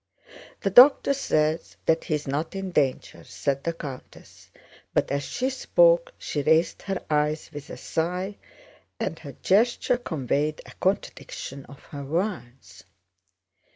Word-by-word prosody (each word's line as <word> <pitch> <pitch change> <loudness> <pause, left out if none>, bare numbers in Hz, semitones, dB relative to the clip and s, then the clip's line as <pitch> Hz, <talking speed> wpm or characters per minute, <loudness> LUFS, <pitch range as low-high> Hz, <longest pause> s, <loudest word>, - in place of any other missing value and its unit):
"The 195 - 0
doctor 270 +5 +7
says 155 - 0
that 160 0 +2
he 155 - 0
is 150 -1 -5
not 150 +7 -2
in 195 -1 -4
danger," 140 -6 -1
said 140 -1 -2
the 170 - -1
countess, 140 -6 -10 0.5
but - - +1
as 140 - 0
she 255 - -2
spoke - - +3
she 145 - -3
raised 160 +4 +2
her 195 -2 -4
eyes 150 +1 0
with 145 -1 -8
a - - -7
sigh, 180 +4 -2 0.6
and - - -3
her - - -9
gesture 240 +5 +3
conveyed 150 - -1
a - - -12
contradiction 140 -7 -3
of 140 - -14
her 140 -1 -6
words. 155 - -4
160 Hz, 140 wpm, -25 LUFS, 145-195 Hz, 0.6 s, doctor